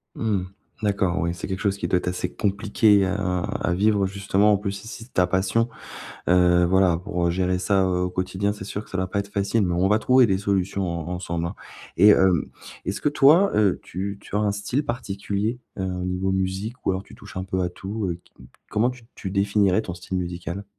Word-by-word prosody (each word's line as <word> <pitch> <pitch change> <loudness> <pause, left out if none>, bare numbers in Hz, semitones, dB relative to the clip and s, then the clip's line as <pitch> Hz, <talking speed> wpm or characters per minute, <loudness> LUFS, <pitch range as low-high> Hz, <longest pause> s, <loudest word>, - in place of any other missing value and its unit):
Mmh 110 -1 -1
mh. 90 0 -4 0.4
D'accord, 95 -3 +1
ouais, 85 -1 0
c'est 85 - -6
quelque 95 -1 -3
chose 100 -2 0
qui - - -2
doit 90 - +2
être 90 - -3
assez 90 0 -3
compliqué 100 0 +3
heu, - - -1
à 95 -2 -1
à 90 - -1
vivre 100 +1 +2
justement, 100 +1 +2
en 105 - +4
plus 100 0 -3
si 100 +2 -9
si 115 -1 -8
c'est 125 - -26
ta 90 - +4
passion, 95 +6 +1 0.6
heu, 90 0 +5
voilà, 90 -1 +3
pour 90 0 -2
heu, 85 - +2
gérer 90 +1 0
ça, 95 +1 +2
heu, 90 -1 0
au 90 - 0
quotidien, 95 +2 -1
c'est 105 -2 -7
sûr 105 +1 -5
que - - -20
ça 95 - -4
doit 95 0 0
pas 100 - -1
être 100 0 -5
facile, 100 +3 +1
mais 90 - 0
on 90 +2 +2
va 105 +2 +3
trouver 130 +2 +5
des 95 -2 +2
solutions 100 -1 0
en 85 -2 -4
ensemble, 85 -2 -3
hein! 90 +5 -5 0.4
Et 105 - +7
hem, 95 -5 +4 0.4
est-ce 95 +2 -3
que - - -1
toi, 150 +7 +5
heu, 105 -3 +3
tu 100 +3 -4
tu 100 - -8
as - - +3
un 105 -1 +2
style 105 +8 -2
particulier, 105 -1 -3 0.2
heu, - - -1
au 90 -1 -3
niveau 90 +1 -1
musique 95 +6 -3
ou - - +2
alors 95 +1 -3
tu - - -15
touches - - -11
un 95 - -3
peu 95 -1 -1
à 90 - 0
tout, 100 +3 -4
heu, 85 0 -4
qui - - -27 0.4
comment 110 +3 +2
tu 125 -1 -9
tu 95 - -5
définirais 100 0 +2
ton 90 - -5
style 90 +1 -5
musical? 90 +2 -4
95 Hz, 240 wpm, -24 LUFS, 90-105 Hz, 0.6 s, Et